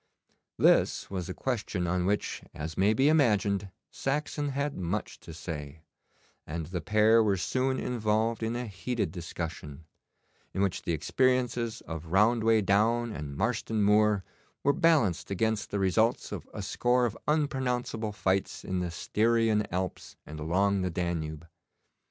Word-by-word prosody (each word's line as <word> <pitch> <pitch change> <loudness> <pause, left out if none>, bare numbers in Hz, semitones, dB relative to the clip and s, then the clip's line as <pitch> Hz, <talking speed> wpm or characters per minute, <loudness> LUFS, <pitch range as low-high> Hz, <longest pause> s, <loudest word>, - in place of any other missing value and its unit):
This - - +3
was 95 -2 -4
a - - -3
question 110 -8 -2
on 90 +1 0
which, 105 +1 -1
as 80 +1 -5
may 100 +3 +3
be 130 +6 +3
imagined, 105 -10 +2 0.2
Saxon 145 +1 -2
had 140 +1 -2
much 95 +4 -3
to 80 - -11
say, 80 -2 -7 0.6
and 80 +1 -4
the 90 +2 -4
pair 110 +4 +4
were 100 -3 +2
soon 130 +7 0
involved 110 -1 0
in 115 +1 -1
a 125 +1 -3
heated 110 -1 -3
discussion, 80 -3 -6 0.7
in 95 - +1
which 95 -2 -1
the - - -2
experiences 120 - 0
of 80 0 -7
Roundway 110 +4 +4
Down 115 +4 +2
and 70 -7 -6
Marston 110 -1 0
Moor 105 -1 +4 0.4
were 140 - +4
balanced 145 - +2
against 110 +2 0
the 100 - -2
results 100 +4 +1
of - - -6
a - - -6
score 125 0 +2
of 115 - -2
unpronounceable 125 -7 0
fights 95 -1 -1
in 95 -1 -1
the 90 -1 -2
Styrian 110 +4 +1
Alps 90 0 -4
and 75 +1 -8
along 95 +5 +1
the 90 - 0
Danube. 85 -2 -3
105 Hz, 145 wpm, -29 LUFS, 90-115 Hz, 0.7 s, pair